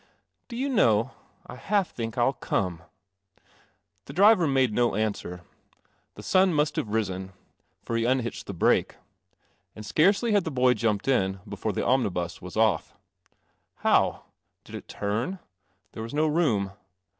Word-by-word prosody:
" - - -52
Do 235 - -7
you 270 +3 -1
know, 120 - +3 0.3
I 125 - -10
half 200 +2 0
think 115 0 -5
I'll 125 +3 +3
come." 90 -9 -2 1.2
The - - -9
driver 200 -2 +5
made 130 -5 +2
no 120 -2 +1
answer. 100 -4 -3 0.7
The - - -10
sun 185 -2 +3
must 150 0 +1
have - - -2
risen, 95 -3 -2 0.5
for 115 - -3
he 115 0 +1
unhitched 125 -1 -1
the 100 - -5
brake. - - +2 0.8
And 110 - -9
scarcely 195 - +3
had 205 -3 +3
the 160 - -3
boy 125 -3 +3
jumped 110 -2 -1
in 95 -7 +1
before 100 +2 -3
the - - -2
omnibus 90 -10 0
was 90 +3 -8
off. 110 -7 +1 0.9
How? - - +3 0.4
Did - - -15
it - - -8
turn? 115 - -3 0.5
There 110 - -8
was 115 +5 -6
no 155 +1 +2
room. 140 - +1
115 Hz, 155 wpm, -26 LUFS, 100-155 Hz, 1.2 s, driver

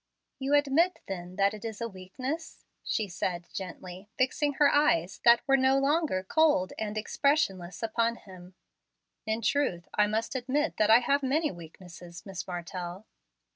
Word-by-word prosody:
"You 275 +2 +1
admit, 290 +5 +3
then, 180 -1 -6
that 200 +1 +2
it 210 - -9
is 220 -2 -5
a 235 - -2
weakness?" 255 - -6 0.2
she 215 - -1
said 175 -1 -3
gently 185 +1 -8
fixing 285 +3 +1
her 285 0 +4
eyes, 190 - +2
that 235 0 +6
were 270 - +5
no 265 0 +3
longer 280 - +1
cold 290 -5 +2
and 215 -1 -3
expressionless, 210 - 0
upon 230 +1 0
him. 185 -3 -14 0.7
"In 220 +1 -1
truth, 265 - 0
I 210 0 +3
must 220 +3 -2
admit 270 +4 -1
that 215 - +2
I 225 +2 +7
have 280 +3 +1
many 295 +4 +1
weaknesses, 170 0 -12
Miss 190 -5 -6
Martell." 180 +2 -6
220 Hz, 155 wpm, -29 LUFS, 185-275 Hz, 0.7 s, I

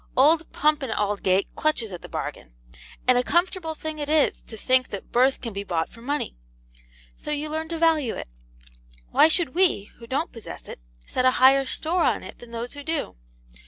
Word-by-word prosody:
Old 310 +5 +4
Pump 300 0 +2
and 265 -4 -3
Aldgate 200 -2 0
clutches 270 -9 0
at 180 - -7
the - - -10
bargain. - - -6 0.5
And 250 -1 +6
a - - +1
comfortable 345 0 0
thing 310 0 -5
it 290 0 -3
is 310 -1 +3
to 220 - -10
think 255 +3 +2
that 200 - -7
birth 260 +2 +3
can 230 -4 -5
be 200 0 -4
bought 170 -4 -1
for 230 - -14
money. 285 - -3 0.8
So - - -9
you 300 +1 -2
learn 315 +1 -3
to 335 - -3
value 320 -7 +2
it. - - -6 0.8
Why - - +7
should 320 -4 +2
we, 345 - +2
who 230 - -11
don't 280 +7 -1
possess 230 -3 -9
it, - - -8 0.3
set 255 - -1
a - - +8
higher 270 +1 +6
store 340 +6 0
on - - +1
it - - -10
than 240 - -12
those 235 +1 -5
who 285 - -8
do? 320 +1 -3
275 Hz, 200 wpm, -25 LUFS, 230-315 Hz, 0.8 s, a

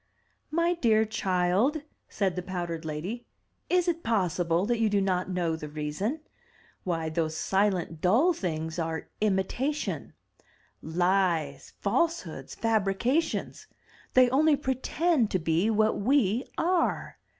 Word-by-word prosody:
'* - - -45
"My 340 +1 +3
dear 220 -9 +3
child,*' 200 - +1 0.3
said 195 -3 -1
the 180 - -2
powdered 175 -3 -4
lady, 175 +11 -5 0.4
"is 360 -1 +2
it 335 -1 0
possible 180 - +1
that 235 +1 0
you 225 -1 +3
do 205 -1 +2
not 185 -1 0
know 175 -3 0
the 150 -2 -7
reason? 155 - -3 0.6
Why, 165 -3 -2
those 160 0 -1
silent, 190 -5 0
dull 245 - +4
things 160 - -3
are 160 -1 -3
imitation; 215 +9 -1 0.7
lies, 170 -4 0
falsehoods, 200 - -1
fabrications! 225 - 0 0.5
They 255 0 +7
only 300 +3 +4
pretend 265 0 0
to - - +1
be 165 +4 +1
what 215 -1 +2
we 240 -1 +2
are! 350 +1 0
195 Hz, 125 wpm, -28 LUFS, 170-255 Hz, 0.7 s, They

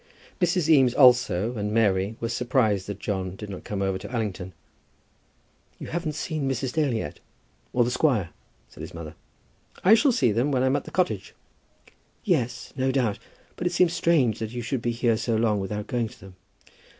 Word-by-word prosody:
Mrs. 175 -2 +2
Eames 135 -6 +5
also, 120 -5 +4
and 105 -1 -2
Mary, 105 -2 +1
were 115 - -2
surprised 115 -5 +1
that 100 -2 -5
John 95 -3 -3
did 105 +1 -8
not 95 - -8
go 100 -2 -3
over 95 -1 -1
to - - -9
Allington. 100 -6 -3 1.3
"You - - -8
haven't 165 -3 -3
seen 155 -4 -2
Mrs. 130 -1 -2
Dale 145 -6 +1
yet, 75 -10 -4 0.5
or 125 - +3
the 120 - -1
squire?" 125 - +1 0.4
said - - -13
his - - -8
mother. 80 -2 -7 0.7
"I 195 - +7
shall 235 +5 +5
see 130 - +2
them 120 +7 +1
when 130 -2 +1
I - - +3
am 130 +1 +2
at 145 - -2
the - - -8
cottage." 185 -1 -1 0.9
"Yes; 130 - -1
no 130 0 +1
doubt. 125 -6 0 0.4
But 175 - -2
it 175 - -2
seems 175 -1 +3
strange 140 - +2
that 110 -1 -3
you 120 -1 -4
should 130 +1 -2
be 120 - -1
here 115 -1 +1
so 115 +1 -1
long 110 -2 +2
without 105 +2 -4
going 120 -2 -1
to - - -15
them." 95 0 -13
120 Hz, 195 wpm, -25 LUFS, 105-140 Hz, 1.3 s, I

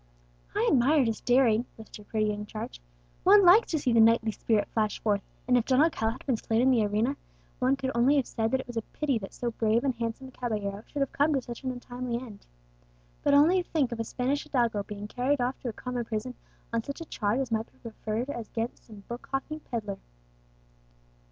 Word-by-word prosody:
"I - - +2
admired 275 +2 +4
his 225 -2 -2
daring," 245 -2 +3
lisped 220 -1 -11
her 210 - -13
pretty 215 +1 -1
young 210 0 -4
charge. 205 - -7 0.4
"One 400 +1 +7
likes 385 +6 +7
to 320 - +1
see 260 -5 +1
the 230 - +5
knightly 225 0 +5
spirit 215 0 0
flash 215 -2 -1
forth; 205 -2 +1 0.3
and 250 - +4
if 240 -2 +3
Don 260 0 +3
Alcala 255 -8 +2
had 255 - -13
been 255 -5 +1
slain 225 +1 0
in 260 +2 +4
the 235 -4 +3
arena, 215 +6 +1 0.4
one 255 +2 +3
could 265 -1 -3
only 245 +5 +4
have 275 -4 +2
said 225 -1 -1
that 260 +1 +1
it - - -13
was 245 -1 -7
a - - +1
pity 275 +1 -2
that 195 - -8
so 240 -1 -3
brave 225 0 +1
and 270 -2 +1
handsome 235 +3 -4
a - - -15
caballero 210 -5 -3
should 275 -1 -1
come 290 +1 +2
to 270 - +1
such 240 +1 -8
an 260 - -1
untimely 245 -1 -4
end. 225 -5 -11 0.7
But 285 - +3
only 335 +6 +5
think 305 -7 0
of 235 - -4
a - - 0
Spanish 260 +5 -1
hidalgo 235 -6 0
being 205 0 -7
carried 255 +5 0
off 250 +2 -1
to 250 - -4
a - - -5
common 250 +1 -4
prison 225 +2 -4 0.4
on 230 - +1
such 280 +7 -7
a - - -5
charge 215 -4 -1
as 260 -3 -2
might 225 0 -1
be - - -28
preferred 225 +2 -4
against 230 -2 -4
some 210 -3 -12
book 240 +1 -7
hawking 275 +3 -3
pedlar!" 215 -8 -5
240 Hz, 220 wpm, -28 LUFS, 220-265 Hz, 0.7 s, One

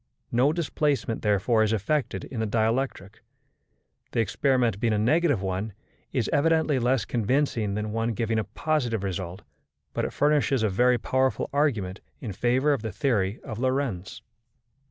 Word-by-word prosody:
No 125 +5 +3
displacement, 150 -7 -1
therefore, 105 +2 +2
is 110 -1 +2
effected 120 +7 -1
in 125 - -6
the 110 - 0
dielectric. 110 -2 -1 0.9
The - - 0
experiment 120 -2 +1
being 115 -1 +1
a - - +1
negative 145 - +2
one, 95 +3 -2 0.4
is 125 -5 0
evidently 160 -1 +3
less 125 -2 +1
convincing 115 -3 0
than 105 0 -3
one 115 +1 -1
giving 115 0 0
a - - 0
positive 120 -2 -1
result, 95 0 -4 0.5
but - - -1
it - - -2
furnishes 145 -4 +2
a 110 - +2
very 125 +6 +3
powerful 130 +1 0
argument 110 -11 0 0.2
in 110 -6 -5
favour 130 +8 +2
of 135 - -2
the 110 -1 -4
theory 105 -4 0
of 110 -1 -6
Lorentz. 130 -8 -2
115 Hz, 155 wpm, -26 LUFS, 105-135 Hz, 0.9 s, No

